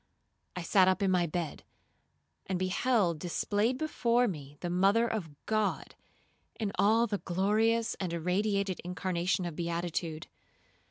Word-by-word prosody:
I 180 - -4
sat 185 +2 +4
up 190 +2 +2
in 190 - +2
my 175 -2 +2
bed, 165 -1 -4 0.8
and 190 - -1
beheld 185 -2 +1
displayed 205 +8 0
before 245 -5 +1
me 145 -6 -6
the 175 - -2
mother 195 +6 +3
of 215 -8 -3 0.2
God, 215 -1 -1 0.7
in 210 -3 -1
all 220 +4 +4
the 205 -3 -2
glorious 220 +5 +1
and 185 -3 -2
irradiated 190 +3 0
incarnation 180 +1 -1
of 170 -3 -5
beatitude. 170 -1 -3
185 Hz, 130 wpm, -31 LUFS, 175-215 Hz, 0.8 s, sat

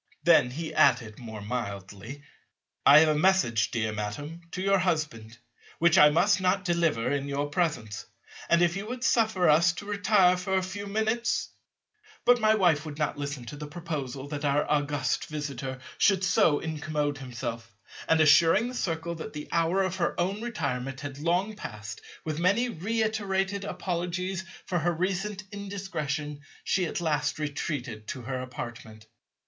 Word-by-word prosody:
Then 125 - +5
he 155 +5 -5
added 110 -4 +3
more 110 -3 -8
mildly, 105 +3 -6 0.6
"I 145 - +10
have 160 - +4
a - - +4
message, 150 - +3
dear 110 -2 -1
Madam, 145 +11 -5
to 180 - -6
your 195 +1 +3
husband, 150 -11 -2 0.4
which 170 0 +4
I 150 - +8
must 195 +6 +3
not 185 +1 +1
deliver 165 -9 +1
in 140 -1 -1
your 140 +1 -2
presence; 145 - -2 0.4
and, 170 +1 +5
if 170 0 +2
you 200 +2 -4
would 245 +1 -5
suffer 220 -7 +3
us 165 +3 +5
to 190 - -8
retire 200 -3 +3
for 190 +1 -1
a 190 - +1
few 200 +2 -5
minutes—" 220 +3 0 0.8
But 245 0 +6
my 215 -1 +4
wife 175 -7 +3
would 150 -2 -7
not 150 -1 -1
listen 140 -3 -4
to 145 - -7
the 150 +1 -7
proposal 145 -5 -5
that 150 0 -5
our 145 0 +1
august 145 -3 0
Visitor 140 -4 -5 0.2
should 195 -3 +4
so 160 -4 +4
incommode 150 -2 -2
himself, 115 -4 -6 0.3
and 160 - +4
assuring 165 - +5
the - - -7
Circle 170 -7 -2
that 165 -2 -7
the 150 -1 -6
hour 170 +4 +2
of 185 0 -2
her 175 -1 -1
own 195 +4 -1
retirement 135 - -3
had 140 -1 -7
long 180 +7 0
passed, 105 - -8 0.2
with 155 -1 -3
many 200 +8 +2
reiterated 200 -1 -1
apologies 185 0 -3 0.2
for 180 - 0
her 175 +2 +1
recent 190 +3 -2
indiscretion, 155 -8 -4 0.2
she 185 -3 +1
at 190 - -3
last 150 -3 0
retreated 140 -7 -4
to 130 - -5
her 130 +1 -3
apartment. 120 -3 -8
160 Hz, 165 wpm, -28 LUFS, 140-190 Hz, 0.8 s, I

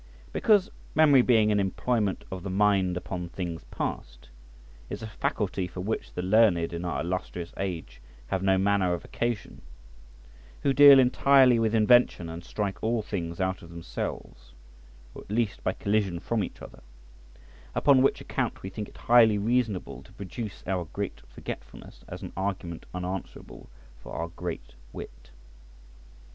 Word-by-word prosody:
Because, 210 -2 +3 0.2
memory 145 -4 +6
being 110 -4 +4
an 105 - +2
employment 100 +1 -1
of 95 -1 -5
the 95 - -5
mind 95 -2 +2
upon 90 -1 -5
things 85 -3 -5
past, - - -5 0.6
is - - -6
a - - -4
faculty 95 -2 -2
for 90 +1 -7
which 110 +4 -3
the 90 - -3
learned 95 -4 +3
in 85 +1 -4
our 85 - -2
illustrious 90 0 -4
age 85 -10 -5 0.2
have 95 +9 -2
no 95 0 +3
manner 95 -2 +2
of 85 - -9
occasion, 120 -3 -3 1.0
who 140 - +3
deal 140 0 +9
entirely 130 -1 +5
with 115 0 +1
invention 110 -6 +4
and 85 +1 -7
strike 100 -3 -3
all 115 0 0
things 85 -5 -4
out 95 0 -1
of 85 - -12
themselves, 80 -7 -7 0.6
or - - -9
at - - -17
least 110 -1 -1
by - - +1
collision 100 -4 0
from 110 +3 -1
each - - -8
other; - - -12 0.9
upon 140 -3 +5
which 135 - +3
account, - - -3
we 95 - -5
think 105 +1 -6
it - - -18
highly 115 -3 +5
reasonable 110 -2 -1
to - - -18
produce 100 -1 -7
our 90 -2 -1
great 100 +4 -5
forgetfulness - - -9
as - - -8
an - - -7
argument 95 -3 -4
unanswerable 90 +1 -6 0.3
for - - -10
our 85 +1 -3
great 85 0 -6 0.2
wit. - - -10
95 Hz, 155 wpm, -27 LUFS, 90-115 Hz, 1.0 s, deal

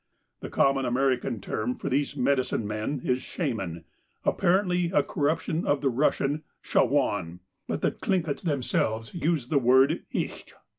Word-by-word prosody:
The - - -7
common 135 0 +2
American 125 -2 0
term 115 +5 -2
for - - -6
these 140 +1 0
medicine 130 -4 +1
men 110 +6 -3
is 125 0 0
shaman, 95 - -4 0.4
apparently 180 -1 +2
a 145 -6 +3
corruption 155 +2 -1
of 145 -1 +2
the 135 -2 +2
Russian 140 +3 +1 0.2
shawaan, 100 - +1 0.3
but - - -2
the - - +3
Tlinkits 170 -7 -1
themselves 120 -7 -1
use 160 -7 -1
the 145 - +3
word 130 +2 +4
icht. - - -4
135 Hz, 140 wpm, -27 LUFS, 120-150 Hz, 0.4 s, word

